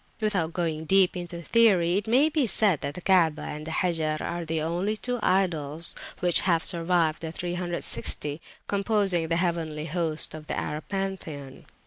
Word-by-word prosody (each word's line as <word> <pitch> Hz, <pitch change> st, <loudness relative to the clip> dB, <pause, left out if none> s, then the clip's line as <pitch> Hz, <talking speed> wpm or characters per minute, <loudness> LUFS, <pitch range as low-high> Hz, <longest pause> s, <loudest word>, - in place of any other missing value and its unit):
Without 195 Hz, -7 st, 0 dB
going 160 Hz, -3 st, -2 dB
deep 190 Hz, +2 st, +4 dB
into 175 Hz, -1 st, -6 dB
theory, 185 Hz, -6 st, +4 dB
it 205 Hz, +2 st, -1 dB
may 260 Hz, +7 st, +4 dB
be 300 Hz, -5 st, +1 dB
said 200 Hz, -7 st, +2 dB
that 140 Hz, 0 st, -4 dB
the 180 Hz, -, -8 dB
Kaabah 170 Hz, -5 st, +3 dB
and 150 Hz, +1 st, -8 dB
the -, -, -4 dB
Hajar 160 Hz, -3 st, 0 dB
are 170 Hz, 0 st, -4 dB
the 160 Hz, 0 st, -1 dB
only 175 Hz, +7 st, -1 dB
two 245 Hz, +2 st, -2 dB
idols 165 Hz, -5 st, +1 dB, 0.3 s
which 175 Hz, -2 st, +3 dB
have 170 Hz, -3 st, +1 dB
survived 170 Hz, -2 st, +1 dB
the 160 Hz, -1 st, -5 dB
360 170 Hz, -4 st, -1 dB, 0.3 s
composing 200 Hz, -4 st, +1 dB
the 165 Hz, -, 0 dB
heavenly 165 Hz, -3 st, -2 dB
host 160 Hz, -1 st, -1 dB
of 155 Hz, -1 st, -9 dB
the -, -, -3 dB
Arab 150 Hz, +1 st, -4 dB
pantheon. 185 Hz, -9 st, -5 dB
170 Hz, 165 wpm, -26 LUFS, 160-190 Hz, 0.3 s, deep